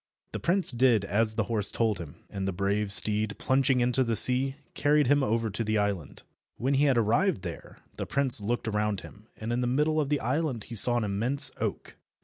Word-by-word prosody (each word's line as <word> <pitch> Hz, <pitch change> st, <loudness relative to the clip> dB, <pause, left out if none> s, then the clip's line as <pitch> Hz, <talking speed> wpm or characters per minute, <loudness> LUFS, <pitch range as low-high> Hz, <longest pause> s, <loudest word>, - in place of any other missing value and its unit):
The -, -, -5 dB
prince 185 Hz, +2 st, +1 dB
did 120 Hz, -4 st, +2 dB
as 110 Hz, +3 st, -1 dB
the 110 Hz, -, 0 dB
horse 105 Hz, -2 st, -2 dB
told 110 Hz, -4 st, -1 dB
him, 80 Hz, -5 st, -9 dB
and 95 Hz, -1 st, -6 dB
the -, -, -1 dB
brave 100 Hz, +2 st, -2 dB
steed, 105 Hz, +1 st, +2 dB
plunging 130 Hz, -1 st, +1 dB
into 125 Hz, +2 st, +1 dB
the 115 Hz, -2 st, -2 dB
sea, 130 Hz, +4 st, +5 dB, 0.2 s
carried 150 Hz, 0 st, +1 dB
him 145 Hz, +3 st, +2 dB
over 115 Hz, -3 st, -1 dB
to 105 Hz, +4 st, -3 dB
the 110 Hz, 0 st, -1 dB
island. 100 Hz, -7 st, -4 dB, 0.3 s
When 130 Hz, +4 st, -2 dB
he 140 Hz, +2 st, +2 dB
had 135 Hz, -4 st, +2 dB
arrived 115 Hz, -, 0 dB
there, 85 Hz, -3 st, -9 dB, 0.2 s
the -, -, -5 dB
prince 135 Hz, -5 st, +6 dB
looked 115 Hz, +3 st, -3 dB
around 105 Hz, -2 st, -2 dB
him, 105 Hz, +1 st, -15 dB
and 115 Hz, +2 st, -5 dB
in 120 Hz, -, -1 dB
the 125 Hz, -, -1 dB
middle 150 Hz, +5 st, 0 dB
of 140 Hz, -, -4 dB
the 145 Hz, -1 st, 0 dB
island 130 Hz, -1 st, -3 dB
he 120 Hz, -, -10 dB
saw 120 Hz, +3 st, +5 dB
an 120 Hz, -, -1 dB
immense 120 Hz, +8 st, -1 dB
oak. -, -, -5 dB
115 Hz, 215 wpm, -27 LUFS, 105-135 Hz, 0.3 s, prince